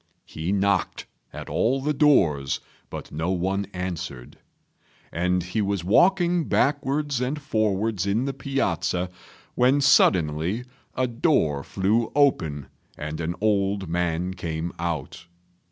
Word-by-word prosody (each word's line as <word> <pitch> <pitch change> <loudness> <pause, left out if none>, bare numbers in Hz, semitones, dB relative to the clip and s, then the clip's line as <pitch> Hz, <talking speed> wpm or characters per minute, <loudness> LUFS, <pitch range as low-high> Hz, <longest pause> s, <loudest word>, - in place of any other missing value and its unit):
He 80 +4 -4
knocked 100 -1 0 0.3
at - - -8
all 130 +4 +1
the 150 +3 -1
doors, 85 - +3 0.3
but - - -8
no 80 +3 -2
one 95 +2 -1
answered; 90 -9 -6 0.7
and 90 +2 0
he 90 +5 -2
was 100 -3 -1
walking 175 - +3
backwards 140 -1 0
and 135 +4 -1
forwards 110 - 0
in 110 +6 +1
the 140 - -2
piazza 90 - -1 0.4
when 130 +3 +3
suddenly 95 - +3 0.3
a 130 - +1
door 120 - +1
flew 105 - 0
open 80 - +2 0.3
and 75 +2 -5
an 85 +2 -2
old 100 -2 +1
man 85 +1 -1
came 85 -2 -4
out. 85 0 -4
95 Hz, 120 wpm, -25 LUFS, 85-130 Hz, 0.7 s, doors